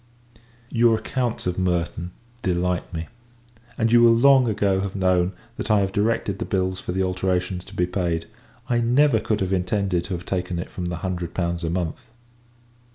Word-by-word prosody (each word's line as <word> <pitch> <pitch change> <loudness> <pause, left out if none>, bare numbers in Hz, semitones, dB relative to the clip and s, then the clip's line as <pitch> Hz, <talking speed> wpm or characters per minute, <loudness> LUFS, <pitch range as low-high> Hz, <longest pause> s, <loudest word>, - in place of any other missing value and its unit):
Your 115 -1 +4
accounts 120 +1 -2
of 90 0 -1
Merton 85 -1 -1 0.3
delight 90 -1 -1
me; 80 -1 -5 0.7
and 115 0 +1
you 120 0 +6
will 115 -1 +7
long 135 +1 +6
ago 100 -3 +1
have 100 0 -3
known, 90 -1 +2 0.2
that - - -4
I 105 -2 +4
have 95 -1 0
directed 100 -1 0
the - - -2
bills 95 -1 -1
for - - -5
the 95 +1 0
alterations 90 -1 -1
to 95 - -12
be 90 - +2
paid. 85 -2 -1 0.4
I 120 -2 +2
never 125 +1 +4
could 105 -1 -1
have 95 0 0
intended 95 -1 0
to 95 - -3
have 85 - -8
taken 90 -2 -2
it 85 - -5
from 90 - -5
the 85 - -2
hundred 90 -2 -3
pounds 85 -1 -1
a 80 - -1
month. 85 -2 -2
95 Hz, 185 wpm, -23 LUFS, 90-110 Hz, 0.7 s, will